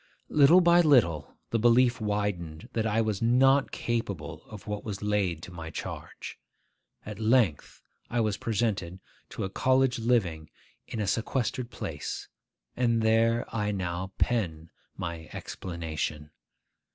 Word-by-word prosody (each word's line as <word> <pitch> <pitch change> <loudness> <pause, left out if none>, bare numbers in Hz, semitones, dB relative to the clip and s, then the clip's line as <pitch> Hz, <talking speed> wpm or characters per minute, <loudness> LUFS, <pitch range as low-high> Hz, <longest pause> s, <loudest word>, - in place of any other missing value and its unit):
Little 150 +5 +6
by 175 0 +6
little, 115 - +3
the 115 - +1
belief 120 +2 +4
widened 100 -7 -2
that 110 -1 0
I 110 +1 +2
was 110 -3 -1
not 135 +4 +4
capable 100 -10 -3
of 105 -3 -10
what 105 -1 -4
was 105 -2 -5
laid 100 -6 0
to - - -8
my 80 -2 -7
charge. - - -7 0.7
At 105 0 -7
length 110 - +1 0.3
I 120 - 0
was 110 -3 +1
presented 100 -5 -1 0.3
to - - -5
a 95 - -2
college 130 0 +2
living 95 -10 0 0.4
in 115 - -5
a 105 - 0
sequestered 120 +4 -1
place, - - -5 0.5
and 115 -2 +2
there 115 +1 +3
I 105 -2 0
now 95 -1 -3
pen 85 -9 -1 0.3
my 80 -1 -5
explanation. 80 -4 -5
105 Hz, 135 wpm, -28 LUFS, 90-120 Hz, 0.7 s, Little